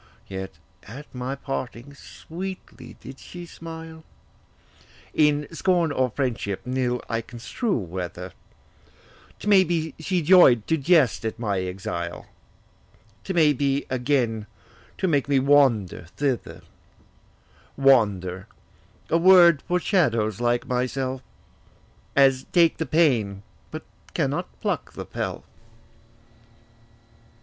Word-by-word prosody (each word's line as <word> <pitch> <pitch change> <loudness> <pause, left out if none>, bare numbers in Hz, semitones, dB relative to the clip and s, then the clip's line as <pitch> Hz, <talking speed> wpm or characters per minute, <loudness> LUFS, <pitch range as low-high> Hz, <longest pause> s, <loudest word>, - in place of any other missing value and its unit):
Yet 95 0 -7 0.3
at 135 +8 -11
my 125 +2 -4
parting 135 -1 -6
sweetly 185 +6 -9
did 130 +1 -11
she 175 -1 -10
smile, 160 -1 -10 1.1
In 150 -1 +3
scorn 175 -2 +1
or 130 -2 +1
friendship, 115 -6 -2
nill 125 -1 -1
I 115 0 -1
construe 125 - -3
whether: 90 -2 -6 1.1
'T - - -9
may 200 -2 +6
be, 160 -4 -2
she 175 +2 -1
joy'd 150 - +6
to 160 - +1
jest 155 -4 +3
at 110 0 -3
my 105 -5 -1
exile, 90 -2 -5 1.0
'T 190 - -4
may 155 -4 +4
be, 140 +1 0
again 120 -4 0 0.5
to 190 - 0
make 145 -4 +1
me 140 - +3
wander 130 -10 +3
thither: 120 - -2 1.1
'Wander,' 100 -8 +2 0.6
a 165 - +4
word 175 -3 +7
for 180 0 +1
shadows 115 - +1
like 120 0 +1
myself, 130 +1 -2 0.9
As 135 -2 +4
take 170 -2 +4
the 160 - -3
pain, 115 -12 +2 0.3
but - - -7 0.3
cannot - - -1
pluck - - -2
the - - -7
pelf. - - -5
135 Hz, 110 wpm, -24 LUFS, 115-160 Hz, 1.1 s, word